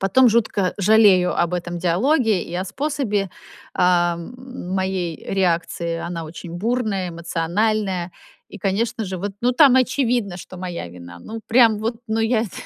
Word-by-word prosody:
потом 240 +7 +5
жутко 210 -5 +1
жалею 200 -3 +5
об 170 0 +1
этом 175 0 -4
диалоге 215 - +2
и 170 - -8
о 185 +2 -1
способе, 215 -4 -2 0.4
а, 175 -1 +3
м, 245 +2 -9
моей 190 -3 -1 0.2
реакции. 170 -2 0
Она 170 0 -4
очень 165 +2 -9
бурная, 210 -1 -1
эмоциональная 175 +3 -1 0.4
и, 205 - -10
конечно 220 +4 -1
же, 190 -1 -5
вот 200 +3 -4
ну 245 - +2
там 275 -1 +6
очевидно, 245 -6 +1
что 185 - -10
моя 175 - -5
вина. 85 0 -11
Ну 225 +1 -7
прям 225 -2 +5
вот, 225 +2 -2
но 220 +1 -1
я 225 0 +2
это 215 - -5
195 Hz, 155 wpm, -21 LUFS, 175-225 Hz, 0.4 s, там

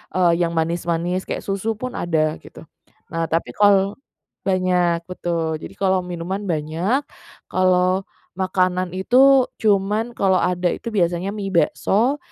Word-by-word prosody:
eee, 180 -2 +4
yang 170 -1 0
manis-manis 170 +2 -1
kayak - - -4
susu 200 +3 -2
pun 255 +4 -5
ada 155 -2 0
gitu. - - -13 0.5
Nah 165 0 -1
tapi 165 +1 -1
kal 200 -1 +4 0.5
banyak, 180 -2 +1
betul, 165 -3 -2
jadi - - -9
kalau 190 -1 +2
minuman 180 +3 -4
banyak, 170 - -1 0.5
kalau 185 0 +2 0.4
makanan 185 -1 0
itu, 260 +7 +5
cuman, 210 +3 +1
kalau 190 -2 +2
ada 180 0 +1
itu - - -8
biasanya 175 -1 0
mie 195 -2 -4
bakso, 225 +9 +2
185 Hz, 130 wpm, -21 LUFS, 170-195 Hz, 0.5 s, itu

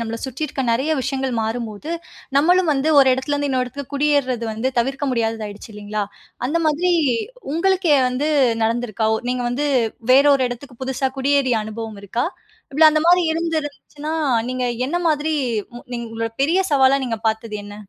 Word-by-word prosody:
நம்மள 230 0 -3
சுத்தி 265 +4 -3
இருக்கிற 270 -2 -3
நெறய 265 +7 +1
விஷயங்கள் 265 0 -2
மாறும்போது, 225 +4 -4 0.5
நம்மளும் 355 +5 +4
வந்து 280 +2 0
ஒரு 270 -1 +6
இடத்துல 265 +3 -2
இருந்து 290 0 -1
இன்னொரு 255 -1 0
இடத்துக்கு 280 +3 -8
குடியேர்றது 280 -4 +1
வந்து 225 +4 -1
தவிர்க்க 270 +4 0
முடியாததாயிடுச்சு, 225 -2 -3
இல்லைங்களா? 210 0 -3 0.4
அந்த 330 +6 0
மாதிரி 335 +4 +2 0.6
உங்களுக்கே 365 -2 +3
வந்து 255 +4 -1 0.4
நடந்துருக்கா? 225 -1 -1
ஒ - - -3
நீங்க 250 -1 -1
வந்து 285 +4 -1 0.5
வேற 275 +2 +7
ஒரு 260 - 0
எடத்துக்கு, 245 +1 -9
புதுசா 265 0 -1
குடியேறிய 270 -2 +2
அனுபவம் 220 -1 -6
இருக்கா? 230 +6 -2 0.5
இல்ல 315 +3 +5
அந்த 310 0 +2
மாதிரி 355 +1 +6
இருந்திருந்துச்சுனா, 310 -2 -4 0.4
நீங்க 255 0 -2 0.2
என்ன 345 - -1
மாதிரி, 310 0 0 0.6
நீங்க 235 -1 -4
உங்களோட 225 0 -3
பெரிய 335 +6 +2
சவாலா, 270 -1 +5
நீங்க 225 -2 -2
பார்த்தது 220 -1 -3
என்ன? 205 0 -9
265 Hz, 160 wpm, -21 LUFS, 230-295 Hz, 0.6 s, வேற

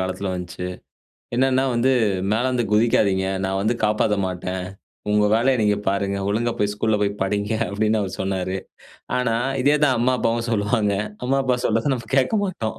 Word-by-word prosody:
காலத்துல 95 +1 -2
வந்துச்சு. 90 0 -5 0.7
என்னன்னா 130 0 +2
வந்து, 125 +3 +2 0.4
மேலருந்து 125 +2 +1
குதிக்காதீங்க, 105 -4 +3 0.2
நான் 95 0 -1
வந்து 115 +3 +1
காப்பாத்த 105 -1 +1
மாட்டேன். 90 0 -4 0.5
உங்க 105 0 +3
வேலய 130 +3 +3
நீங்க 105 -1 +2
பாருங்க, 100 0 0
ஒழுங்கா 115 +3 0
போய் 105 0 +1
ஸ்கூல்ல 110 +1 0
போய் 100 0 +1
படிங்க 100 +2 -1 0.2
அப்டின்னு 110 +2 +1
அவரு 95 -1 -4
சொன்னாரு. 95 -1 -2 0.6
ஆனா, 115 -2 0 0.3
இதேதான் 145 -2 +3
அம்மா 125 +2 +2
அப்பாவும் 115 +1 0
சொல்லுவாங்க. 105 0 +1 0.3
அம்மாப்பா 130 -1 +1
சொல்றத 115 +5 +1
நம்ம 120 -3 -7
கேட்கமாட்டோம். 185 - 0
110 Hz, 145 wpm, -22 LUFS, 100-125 Hz, 0.7 s, குதிக்காதீங்க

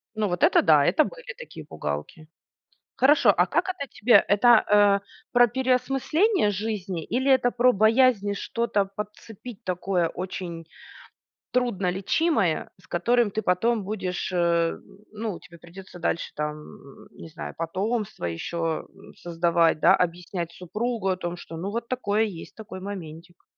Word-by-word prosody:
Ну, 215 -1 0
вот 175 -1 -3
это - - +5
да, 150 -3 +5
это 310 - +3
были - - -8
такие - - -10
пугалки. 75 - -6 0.7
Хорошо, 265 -5 +5
а 175 - +4
как 345 - 0
это 365 -6 -4
тебе? 235 +1 +4
Это, 205 +4 +3
а, 205 -1 +4 0.3
про 245 -1 +6
переосмысление 260 - +1
жизни 195 -4 -4
или 260 +4 0
это 250 -2 +3
про 250 +1 +4
боязнь 220 -1 +3
что-то 210 -1 -1
подцепить 210 +2 -9
такое 180 -1 0
очень 175 -2 -6 0.9
труднолечимое, 200 - 0
с - - -22
которым 235 +5 +2
ты 215 +2 -3
потом 215 +5 +1
будешь, 190 -3 -4
а 170 -1 +2 0.4
ну, 215 -3 -5
тебе 175 -2 -15
придётся 180 +2 -12
дальше 170 0 -2
там, 150 -2 -7
не - - -12
знаю, 160 - -8
потомство 195 - -3
ещё, 160 - -3
м, - - -15
создавать, 170 -1 +1
да, - - +6
объяснять 175 0 -3
супругу 210 +4 -3
о 185 - 0
том, 175 -1 -5
что 165 - -10
ну 185 +4 -4
вот 235 +3 -4
такое 220 -4 0
есть, 190 -7 -6
такой 215 -4 -9
моментик. 175 -3 -9
200 Hz, 145 wpm, -25 LUFS, 170-235 Hz, 0.9 s, про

